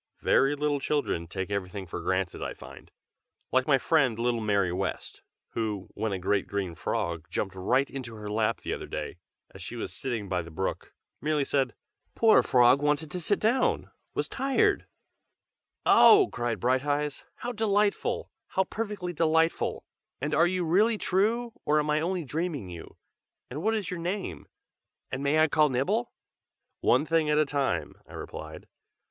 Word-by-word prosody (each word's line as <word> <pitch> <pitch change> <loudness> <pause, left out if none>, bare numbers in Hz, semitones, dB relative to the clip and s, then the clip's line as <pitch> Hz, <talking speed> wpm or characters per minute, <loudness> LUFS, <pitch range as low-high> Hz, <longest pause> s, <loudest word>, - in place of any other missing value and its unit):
Very 135 +2 +4
little 145 0 0
children 140 - -1
take 95 +4 -4
everything 100 0 -3
for 85 - -6
granted 95 -1 -1
I - - -4
find, - - -12 0.6
like 130 0 +2
my 140 -3 +5
friend 135 -5 +2
little 120 0 0
Mary 100 -4 +1
West, 95 +1 -4 0.3
who, 105 -4 -3
when 110 0 -2
a 95 - -1
great 95 +2 0
green 100 -4 -2
frog 85 +1 -3
jumped 95 +2 -2
right 125 +9 +1
into 125 -4 -7
her 105 -1 -8
lap 110 +2 0
the - - -3
other - - -6
day, - - -5 0.3
as - - -11
she - - -6
was - - -5
sitting 120 -6 -3
by 90 -1 0
the 85 - -10
brook, 95 +4 -4 0.3
merely 150 0 +1
said 135 -3 0 0.4
"Poor 225 -1 +6
frog 125 +2 +5
wanted 150 +1 0
to 180 - -3
sit 205 +5 +1
down, 240 +4 +1 0.2
was - - -1
tired!" 335 - +1 1.0
"Oh!" 410 -3 +7
cried 120 -1 -2
Brighteyes. 145 +3 0
"How 245 - -4
delightful! 210 -2 0 0.2
how 190 - +1
perfectly 205 -3 -4
delightful! 160 0 +1 0.3
and 145 +3 -2
are 165 +2 +5
you 180 -1 -1
really 210 +7 +3
true, 225 +6 +1
or 150 +1 +2
am 150 0 0
I 150 +1 +2
only 175 0 -1
dreaming 150 - -3
you? 85 -1 -10 0.5
and 145 +5 -4
what 220 +4 +1
is 205 -4 -3
your 180 - -4
name? 170 - -4 0.6
and 130 - -3
may 140 +2 +2
I 155 0 +5
call 150 0 +3
Nibble?" 195 - 0 0.7
"One 130 +5 +3
thing 160 -1 +2
at 150 - +3
a 155 - +4
time!" 135 - -2
I - - -14
replied. - - -8
145 Hz, 170 wpm, -28 LUFS, 105-175 Hz, 1.0 s, Oh